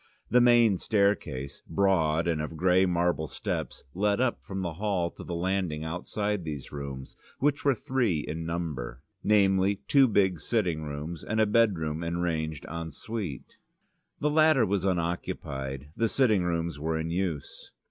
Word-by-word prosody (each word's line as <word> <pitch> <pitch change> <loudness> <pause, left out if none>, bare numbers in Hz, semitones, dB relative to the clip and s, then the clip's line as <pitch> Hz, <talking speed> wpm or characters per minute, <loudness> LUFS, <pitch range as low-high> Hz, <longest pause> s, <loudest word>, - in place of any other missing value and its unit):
The 125 - +6
main 120 -5 +5
staircase, 85 - 0
broad 85 -5 +2
and 80 -3 0
of 75 +1 -5
grey 95 +2 +4
marble 85 -2 +1
steps, - - -4
led 100 +3 +1
up 125 -2 0
from 95 -1 -4
the 85 -2 -3
hall 90 -2 -1
to - - -10
the 85 - -5
landing 90 -3 -1
outside 95 +4 -2
these 75 -4 -6
rooms, 70 -2 -7 0.2
which 145 +1 +1
were 140 -2 +3
three 115 - 0
in 80 +2 -5
number, 80 -7 -4 0.2
namely, 100 -1 +4
two 135 -2 +6
big 95 -6 +2
sitting 90 -3 0
rooms 75 +3 -6
and 110 - -1
a 110 - +5
bedroom 90 -8 +1
arranged 85 -3 -2
en 85 0 -5
suite. 95 - -6 0.6
The 150 - +1
latter 155 -5 +5
was 100 -1 0
unoccupied, 75 -6 -3
the 115 -1 +1
sitting 110 -8 +3
rooms 85 -3 -2
were 80 +1 -1
in 80 +1 -3
use. 85 -5 -3
90 Hz, 155 wpm, -28 LUFS, 80-105 Hz, 0.6 s, The